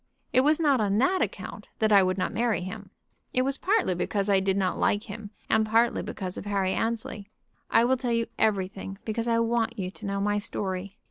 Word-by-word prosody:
It 255 Hz, -, +6 dB
was 300 Hz, +4 st, +3 dB
not 285 Hz, -7 st, +3 dB
on 205 Hz, -1 st, +1 dB
that 365 Hz, -, +2 dB
account -, -, -4 dB
that 220 Hz, -1 st, +2 dB
I 200 Hz, -1 st, +8 dB
would 185 Hz, 0 st, +1 dB
not 185 Hz, -, -1 dB
marry 230 Hz, -1 st, +1 dB
him. 185 Hz, +1 st, -7 dB, 0.4 s
It 255 Hz, -, +2 dB
was 275 Hz, +1 st, -2 dB
partly 400 Hz, -, +2 dB
because 200 Hz, +3 st, -1 dB
I 195 Hz, -, +5 dB
did 190 Hz, 0 st, 0 dB
not 185 Hz, -2 st, 0 dB
like 205 Hz, +1 st, +2 dB
him, 215 Hz, -3 st, -8 dB, 0.2 s
and 220 Hz, -, +3 dB
partly 225 Hz, +2 st, +2 dB
because 185 Hz, -2 st, -4 dB
of -, -, -9 dB
Harry 195 Hz, -2 st, 0 dB
Annesley. 225 Hz, -3 st, -3 dB, 0.4 s
I 230 Hz, -, +5 dB
will 260 Hz, +2 st, +3 dB
tell 250 Hz, -1 st, -3 dB
you 230 Hz, 0 st, +1 dB
everything 195 Hz, -2 st, -1 dB
because 225 Hz, +1 st, -2 dB
I 230 Hz, -1 st, +2 dB
want 230 Hz, 0 st, 0 dB
you 185 Hz, -2 st, -3 dB
to 215 Hz, -, -9 dB
know 200 Hz, 0 st, -1 dB
my 205 Hz, +1 st, +1 dB
story. 195 Hz, -1 st, -3 dB
210 Hz, 215 wpm, -27 LUFS, 195-235 Hz, 0.4 s, I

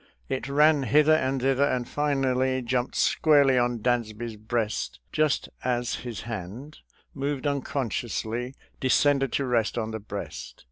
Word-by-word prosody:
It 130 Hz, 0 st, -3 dB
ran 150 Hz, +1 st, +4 dB
hither 150 Hz, +5 st, +4 dB
and 135 Hz, -3 st, +1 dB
thither, 135 Hz, +1 st, +3 dB
and 130 Hz, -4 st, 0 dB
finally 130 Hz, -3 st, 0 dB
jumped 125 Hz, +1 st, -1 dB
squarely 140 Hz, -4 st, +4 dB
on 120 Hz, -2 st, -1 dB
Dansby's 120 Hz, -2 st, -1 dB
breast 110 Hz, -, -2 dB
just 155 Hz, -2 st, +1 dB, 0.2 s
as 120 Hz, -1 st, -1 dB
his 120 Hz, -3 st, -6 dB
hand, 115 Hz, -, -7 dB, 0.3 s
moved 140 Hz, 0 st, -3 dB
unconsciously, 125 Hz, -3 st, -2 dB, 0.2 s
de 130 Hz, -, -1 dB
scended 140 Hz, -1 st, +3 dB
to 140 Hz, -, 0 dB
rest 120 Hz, -3 st, 0 dB
on 110 Hz, -1 st, -2 dB
the 110 Hz, -, -4 dB
breast. 100 Hz, -1 st, -7 dB
130 Hz, 140 wpm, -26 LUFS, 115-140 Hz, 0.3 s, ran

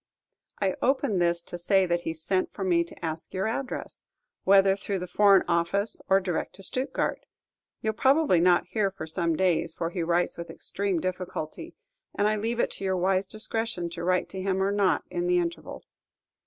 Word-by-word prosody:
I 195 Hz, -2 st, +1 dB
open 260 Hz, -6 st, +1 dB
this 170 Hz, -1 st, +1 dB
to 175 Hz, -, -7 dB
say 190 Hz, +2 st, +3 dB
that 175 Hz, -1 st, 0 dB
he 165 Hz, -, -3 dB
sent 185 Hz, +4 st, -1 dB
for 195 Hz, -, -4 dB
me 175 Hz, -2 st, +3 dB
to 170 Hz, -, -9 dB
ask 160 Hz, +2 st, -5 dB
your 190 Hz, +2 st, 0 dB
address, 245 Hz, +4 st, -4 dB, 0.4 s
whether 195 Hz, 0 st, +6 dB
through 200 Hz, 0 st, -3 dB
the 180 Hz, -, -4 dB
Foreign 195 Hz, +1 st, +5 dB
Office, 170 Hz, +5 st, 0 dB
or 195 Hz, -, +6 dB
direct 185 Hz, -3 st, -3 dB
to 195 Hz, -, -11 dB
Stuttgard. 255 Hz, +7 st, -2 dB, 0.7 s
You 220 Hz, -, +1 dB
'll -, -, -13 dB
probably 270 Hz, -, +3 dB
not 175 Hz, +1 st, +4 dB
hear 210 Hz, -3 st, 0 dB
for 190 Hz, -4 st, -7 dB
some 165 Hz, +1 st, 0 dB
days, 170 Hz, -2 st, +1 dB
for 165 Hz, 0 st, -3 dB
he 175 Hz, -, -3 dB
writes 170 Hz, +1 st, 0 dB
with 170 Hz, -, -6 dB
extreme 195 Hz, -3 st, -2 dB
difficulty, 185 Hz, -, -5 dB, 0.4 s
and 205 Hz, -, +2 dB
I 215 Hz, -, +2 dB
leave 225 Hz, +3 st, -2 dB
it -, -, +1 dB
to -, -, -6 dB
your 190 Hz, -1 st, 0 dB
wise 190 Hz, +1 st, +1 dB
discretion 215 Hz, -4 st, -2 dB
to 170 Hz, -, -6 dB
write 180 Hz, +1 st, +1 dB
to 190 Hz, -, -5 dB
him 190 Hz, 0 st, 0 dB
or 195 Hz, -, +1 dB
not 200 Hz, -2 st, +2 dB
in 175 Hz, 0 st, -1 dB
the 180 Hz, 0 st, +3 dB
interval. 170 Hz, -1 st, -3 dB
185 Hz, 195 wpm, -27 LUFS, 175-200 Hz, 0.7 s, whether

